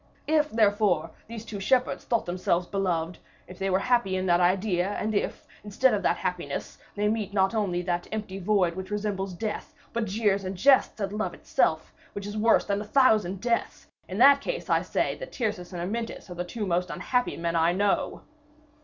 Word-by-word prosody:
If, 305 0 +2
therefore, 205 - +2 0.2
these 225 0 -8
two 210 -3 -6
shepherds 250 +5 +1
thought 235 -2 0
themselves 180 0 0
beloved, 175 -3 -2 0.3
if 185 - -12
they 195 0 -1
were 190 - +3
happy 235 -3 +1
in 185 - -2
that 175 -1 +3
idea, 185 0 +2
and 215 +1 -2
if, 200 - -2 0.2
instead 215 +5 +2
of 205 - 0
that 175 - +1
happiness, 170 -6 -4 0.2
they 210 0 +1
meet 210 -2 -2
not 195 +1 +3
only 190 -5 0
that 175 -1 -2
empty 210 -3 -4
void 190 -3 +2
which 190 0 -6
resembles 205 -2 -2
death, 220 - -5 0.2
but 235 -1 0
jeers 200 -1 +1
and 185 0 -5
jests 265 +1 +4
at 200 -1 -2
love 215 +1 -2
itself, - - 0 0.2
which 200 - -6
is 205 +1 -6
worse 220 +2 +3
than 200 0 -1
a - - -4
thousand 215 -6 +3
deaths, 235 -1 -2 0.2
in 185 - -4
that 280 +4 +7
case, - - -4
I - - +4
say - - -1
that - - -7
Tyrcis 210 -7 -3
and 175 -2 -4
Amyntas 225 0 -4
are - - -4
the 175 0 -4
two 210 +4 -4
most 180 -1 0
unhappy 250 +6 -1
men 170 0 -2
I 165 +1 +3
know." 200 +2 0
200 Hz, 195 wpm, -27 LUFS, 180-220 Hz, 0.3 s, that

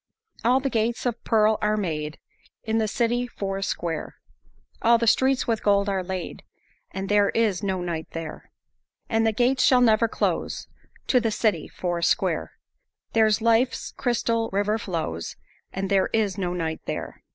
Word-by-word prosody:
"All 250 +3 +4
the 270 0 -2
gates 230 +2 0
of 240 -1 -2
pearl 215 -1 +3
are 215 0 +1
made, 155 -6 -3 0.5
In 220 0 0
the 220 - +1
city 240 +2 0
four 195 -4 -4
square, 170 -4 -3 0.7
All 235 +1 +5
the 230 - 0
streets 260 +3 +3
with 225 -2 0
gold 200 -1 +3
are 190 -2 -1
laid, 185 0 -5 0.5
And 195 0 -5
there 205 0 +3
is 215 -5 +2
no 190 -3 -1
night 165 -3 -3
there. 165 -2 -7 0.6
"And 225 -1 +2
the - - +3
gates 250 +3 +2
shall 255 - +5
never 230 -2 +4
close, - - -2 0.4
To 255 - +4
the 230 -2 0
city 215 0 0
four 175 -1 -3
square, - - 0 0.6
There 220 -1 +5
life's 230 +3 +1
crystal 230 -2 0
river 205 +3 +1
flows, 160 - -4 0.4
And 195 +1 -3
there 195 -1 +2
is 210 -4 +1
no 180 -3 -2
night 160 -2 -3
there." - - -5
215 Hz, 165 wpm, -25 LUFS, 190-230 Hz, 0.7 s, All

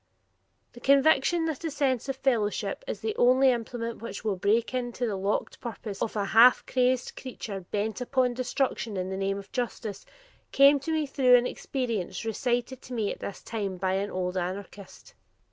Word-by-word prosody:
The 240 - -12
conviction 280 +5 +4
that 320 -1 -3
a 325 - -1
sense 275 -3 0
of 270 - -1
fellowship 245 - 0
is - - -4
the 435 -1 -2
only 255 +2 +5
implement 235 -1 -4
which 230 -3 -6
will 210 -3 0
break 215 +7 +1
into 245 -1 -2
the 215 -4 -1
locked 195 +2 -2
purpose 220 -4 -6
of 225 - -2
a 205 -1 0
half 230 +5 +6
crazed 255 0 +1
creature 225 -6 -6
bent 215 +3 -2
upon 250 0 +1
destruction 250 -3 -2
in 185 +1 -3
the - - -2
name 195 +1 -1
of 200 -1 -10
justice, 230 -5 -4 0.5
came 280 +1 +6
to 300 +4 -4
me 315 -1 +1
through 260 -3 +4
an 245 0 +4
experience 230 -7 -3
recited 245 +3 -1
to 255 - -10
me 220 -4 -1
at - - -7
this 200 - -7
time 200 -5 -4
by 185 +1 0
an 195 +2 -1
old 185 0 -2
anarchist. 190 +2 -6
240 Hz, 180 wpm, -27 LUFS, 200-260 Hz, 0.5 s, half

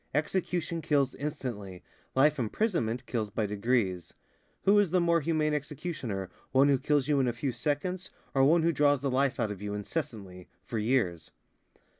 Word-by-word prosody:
Execution 170 +1 -1
kills 140 -4 +1
instantly, 120 - -5 0.3
life 145 +2 +4
imprisonment 125 - -1
kills 110 -4 -2
by 110 +1 -1
degrees. 105 -4 -1 0.5
Who 205 +1 +5
is 205 -4 +3
the 180 +2 +3
more 170 -1 +3
humane 155 0 +1
executioner, 145 - -4 0.2
one 135 +2 +5
who 135 -2 +3
kills 145 -1 +1
you 145 -2 +3
in 130 - +2
a 120 - 0
few 130 +3 -2
seconds 150 +9 -2 0.2
or 135 -1 +4
one 160 +4 +5
who 170 - +3
draws 145 -1 +3
the 140 -1 -1
life 135 0 +1
out 110 -3 0
of 100 -1 -7
you 105 0 -3
incessantly, 100 - -5 0.2
for 115 - -3
years?" 105 -8 0
135 Hz, 170 wpm, -29 LUFS, 110-155 Hz, 0.5 s, Who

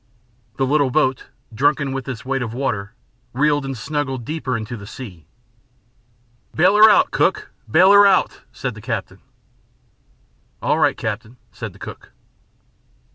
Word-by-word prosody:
The 135 - +1
little 140 0 +2
boat, 130 -1 0 0.3
drunken 140 +3 +1
with 135 -1 -4
this 125 -4 -7
weight 135 0 -1
of 115 -1 -4
water, 105 -5 -3 0.4
reeled 145 +2 +1
and 135 -2 -5
snuggled 135 -1 -3
deeper 140 -5 -3
into 110 +2 -6
the 100 -3 -10
sea. 95 -11 -10 1.3
"Bail 185 +5 +4
her 215 +1 +9
out, 210 - +4
cook! - - 0 0.2
Bail 180 - +6
her 200 0 +8
out," 190 -2 +2
said 125 0 -4
the 105 - -12
captain. - - -5 1.4
"All - - 0
right, - - +2
captain," 110 +3 -5
said - - -7
the - - -17
cook. - - -11
135 Hz, 145 wpm, -20 LUFS, 115-150 Hz, 1.4 s, her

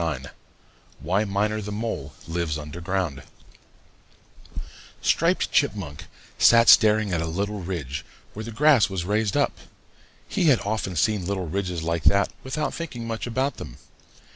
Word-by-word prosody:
IX 70 -4 -3 0.7
WHY 95 +9 0
MINER 105 +2 0
THE 105 0 -6
MOLE 100 -10 -4
LIVES 80 -2 -2
UNDER 75 +3 -8
GROUND 90 -5 -2 1.8
Striped - - +1
Chipmunk 80 -9 -1 0.3
sat 115 0 +6
staring 110 -2 +6
at 85 - 0
a 80 - -2
little 100 +5 -2
ridge 75 -6 -4 0.3
where 110 - -6
the 115 - -7
grass 135 -1 +4
was 95 -3 -3
raised 105 +1 0
up. - - +1 0.7
He - - 0
had 140 -7 +5
often 105 -3 -2
seen 95 +2 +1
little 95 -2 -2
ridges 90 -1 -3
like 85 -1 -2
that 100 0 +3
without 145 +4 -2
thinking 135 -9 -6
much 115 +1 -4
about 130 +4 -1
them. - - -9
100 Hz, 145 wpm, -24 LUFS, 85-110 Hz, 1.8 s, sat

